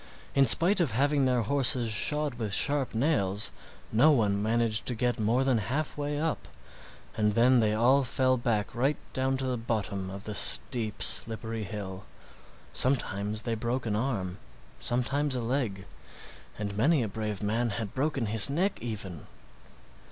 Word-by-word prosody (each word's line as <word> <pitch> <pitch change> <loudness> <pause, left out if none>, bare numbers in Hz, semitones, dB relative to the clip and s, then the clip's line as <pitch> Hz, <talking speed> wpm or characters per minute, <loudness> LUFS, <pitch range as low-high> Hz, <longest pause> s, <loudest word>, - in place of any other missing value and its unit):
In 135 -1 +3
spite 175 - +8
of 145 -10 -1
having 140 +3 +1
their 125 -2 +1
horses 125 -1 +1
shod 150 +6 0
with 110 -4 -3
sharp 140 -5 0
nails, 110 -7 +1 0.4
no 120 +8 +4
one 105 -8 +1
managed 115 0 -1
to 125 - 0
get 120 +1 -2
more 115 +5 +1
than 130 -4 +1
halfway 145 +6 -3
up, 160 0 -3 0.7
and 105 -1 0
then 125 +3 +4
they 105 -1 +1
all 130 +5 +3
fell 130 +1 +1
back 115 -4 -2
right 135 +5 0 0.2
down 130 0 -1
to 135 - -4
the 130 -1 -2
bottom 100 -4 -4
of 100 +1 -9
the 105 - -6
steep, 105 - +3
slippery 115 -1 +1
hill. 95 -3 -8 0.7
Sometimes 110 -5 0
they 115 - -3
broke 120 +3 -3
an 105 -2 -2
arm, 105 -6 -3 0.4
sometimes 135 +3 -1
a 125 - -2
leg, 115 -6 -3 0.7
and 100 -1 -5
many 140 +5 +2
a - - -3
brave 105 -1 -5
man 115 +3 -1
had 110 -1 -5
broken 135 -2 -2
his 105 +1 +5
neck 180 +8 -2
even. 100 -8 -7
115 Hz, 160 wpm, -27 LUFS, 105-135 Hz, 0.7 s, spite